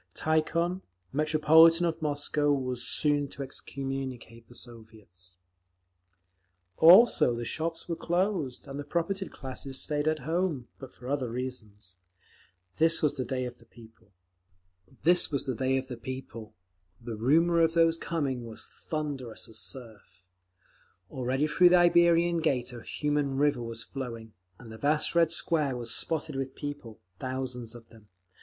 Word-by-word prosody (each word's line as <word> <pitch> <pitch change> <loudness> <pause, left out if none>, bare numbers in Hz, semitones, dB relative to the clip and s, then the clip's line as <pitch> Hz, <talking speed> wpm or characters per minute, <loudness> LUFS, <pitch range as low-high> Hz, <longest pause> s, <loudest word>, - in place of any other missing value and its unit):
Tikhon, 170 +3 0 0.3
Metropolitan 160 +3 +5
of 165 -1 -2
Moscow, 145 0 0
was 130 -3 -1
soon 145 0 +1
to 140 - -7
excommunicate 130 -4 -6
the 120 - -14
Soviets…. 110 -7 -10 1.4
Also 175 - +7
the 120 0 -4
shops 165 +5 -3
were 170 - -2
closed, 175 -7 -1
and 140 +1 -7
the - - -4
propertied 170 +5 -2
classes 135 0 -5
stayed 150 0 0
at 155 0 +2
home—but 145 -5 -3
for 125 - -12
other 135 -3 -1
reasons. 110 -7 -7 0.8
This 165 +1 +3
was 150 -1 +2
the 130 - -2
Day 130 +1 -2
of 125 0 -8
the - - -20
People, 115 -3 -18 0.9
the 125 - -2
rumour 165 +9 +3
of 165 0 +2
whose 165 0 +4
coming 140 -7 -2
was 110 - -8
thunderous 145 -7 -5
as 110 - -4
surf…. 105 -7 -8 0.9
Already 130 +3 -1
through 175 +4 +5
the 180 - +6
Iberian 170 -1 +4
Gate 130 -6 -1
a 120 - -8
human 145 -1 -1
river 145 -3 +2
was 115 -1 -4
flowing, 115 -5 -7 0.2
and 115 -2 -12
the 110 - -10
vast 150 +1 +1
Red 165 -1 +3
Square 150 -6 +1
was 115 -1 -1
spotted 155 -2 0
with 135 0 -4
people, 145 -7 -7 0.2
thousands 125 -2 -4
of 115 -1 -13
them. 110 -2 -18
135 Hz, 135 wpm, -29 LUFS, 120-160 Hz, 1.4 s, Also